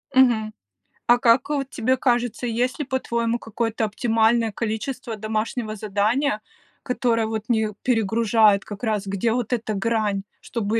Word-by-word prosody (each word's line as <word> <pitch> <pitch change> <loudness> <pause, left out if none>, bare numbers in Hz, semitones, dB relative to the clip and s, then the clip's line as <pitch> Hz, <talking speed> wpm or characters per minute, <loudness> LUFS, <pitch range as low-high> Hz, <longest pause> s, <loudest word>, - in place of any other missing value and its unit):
Мгм. 225 -5 +4 0.5
А 240 - +6
как 245 +2 +3
вот 275 -2 -1
тебе 255 +3 0
кажется, 245 -1 0
есть 245 +4 -1
ли, 295 - -2
по-твоему, 235 -3 -1
какое-то 225 0 -2
оптимальное 225 +1 +2
количество 230 +2 -4
домашнего 215 +1 -3
задания, 215 +4 0 0.4
которое 235 -3 +1
вот 220 -1 -3
не 220 -2 +2
перегружает 220 -3 +3
как 205 +2 -9
раз, 215 -3 0
где 200 +3 0
вот 245 0 -1
эта 225 -2 -1
грань, 210 -1 0 0.2
чтобы 225 -1 -1
225 Hz, 140 wpm, -23 LUFS, 215-245 Hz, 0.5 s, А